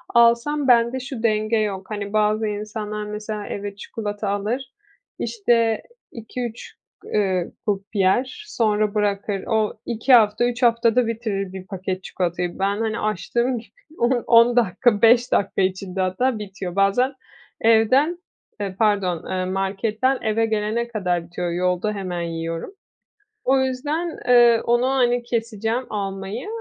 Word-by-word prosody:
alsam 235 +5 +4
bende 240 +1 +4
şu 255 -2 -7
denge 215 0 +2
yok, 200 -3 -2
hani, 205 -1 -5
bazı 215 +1 +2
insanlar 210 0 -4
mesela 210 0 -5
eve 200 0 -5
çikolata 205 0 -5
alır, 230 +7 -2 0.5
işte, 230 - +1 0.3
2-3 235 0 -6 0.3
g - - -12
eee, 190 -4 0 0.2
grup 200 -2 0
yer, 245 - +1
sonra 215 - 0
bırakır. 205 -1 -1
O, 220 -2 0
2 240 +3 +1
hafta, 220 0 +5
3 245 +1 -2
haftada 235 0 +3
bitirir 210 -5 -3
bir 190 -1 -8
paket 185 -1 -4
çikolatayı. 175 0 -3
Ben, 200 +1 +1
hani, 225 0 -1
açtığım 235 +5 -1
gibi 225 - -16 0.3
on 240 0 +1
on 235 +1 +6
dakika, 215 -1 +2
5 240 +2 +5
dakika 195 0 +1
içinde 190 0 -1
hatta 215 +6 0
bitiyor. 195 -3 -6
Bazen 200 +7 +2 0.5
evden, 230 +9 +4 0.4
eee, 195 -2 -3
pardon, 200 -6 +1
eee, 185 0 -1
marketten 210 +7 0
eve 225 0 +1
gelene 220 +2 -1
kadar 180 -7 -1
bitiyor. 175 0 -4
Yolda 180 +4 0
hemen 185 -4 -4
yiyorum. 165 - -4 0.7
O 265 +1 +3
yüzden, 290 +6 -2
eee, 240 -2 +6
onu, 240 +2 +2
hani, 245 -2 +2
keseceğim 230 0 -2
almayı 195 - -4
215 Hz, 140 wpm, -22 LUFS, 195-235 Hz, 0.7 s, on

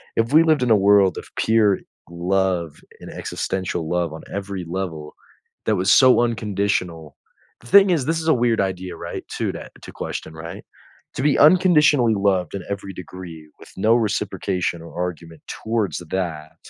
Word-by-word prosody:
if 115 +2 0
we 160 +2 +7
lived 155 -5 +2
in 120 - +1
a - - +7
world 100 -1 +4
of - - -7
pure 110 -3 +3 0.3
love 90 -2 -1 0.2
and - - -9
existential 90 -4 -4
love 85 -3 -1
on 80 - -8
every 100 -2 -4
level 85 -5 -5 0.5
that - - +2
was 95 +1 +1
so 130 -2 +6
unconditional 100 -8 -2 0.5
the 120 - -15
thing 200 +6 +6
is, 160 -8 +1
this 165 +1 -1
is 160 - -1
a - - +6
weird 120 -3 +1
idea, 95 -1 -3
right? 85 0 -7
To - - -1
that - - -9
to - - -10
question, 80 - -6
right? 80 +1 -9 0.5
To - - -3
be 145 0 +2
unconditionally 150 -8 +5
loved 95 -4 0
in 95 - -5
every 100 -1 -5
degree 85 -4 -10
with - - -14
no 110 +4 +3
reciprocation 95 -5 -1
or 85 - -12
argument 85 -3 -5
towards 110 -7 -2
that 80 -4 -4
95 Hz, 170 wpm, -21 LUFS, 85-115 Hz, 0.5 s, we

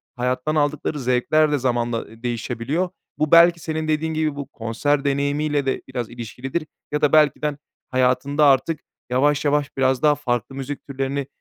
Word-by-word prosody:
hayattan 125 +4 -1
aldıkları 150 0 0
zevkler 130 +5 +2
de 145 - +2
zamanla, 120 -2 0
ııı, 115 +1 -9
değişebiliyor. 120 +8 -2 0.3
Bu 155 -1 0
belki 170 0 +7
senin 160 0 -3
dediğin 155 +1 0
gibi 155 -2 0
bu 140 -2 -6
konser 135 +4 -1
deneyimiyle 140 +1 0
de 135 - -1
biraz 125 -3 -4
ilişkilidir 125 +6 -5 0.2
ya 150 0 -1
da 150 - +3
belki 150 -3 +4
de 150 - +1
ha 145 - -8 0.3
hayatında 130 +3 +2
artık 145 +3 +3 0.3
yavaş 145 +4 +2
yavaş 145 -1 0
biraz 130 -1 +2
daha 150 -1 +4
farklı 125 -3 -2
müzik 135 +1 -6
türlerini 135 0 -3
140 Hz, 170 wpm, -22 LUFS, 125-150 Hz, 0.3 s, belki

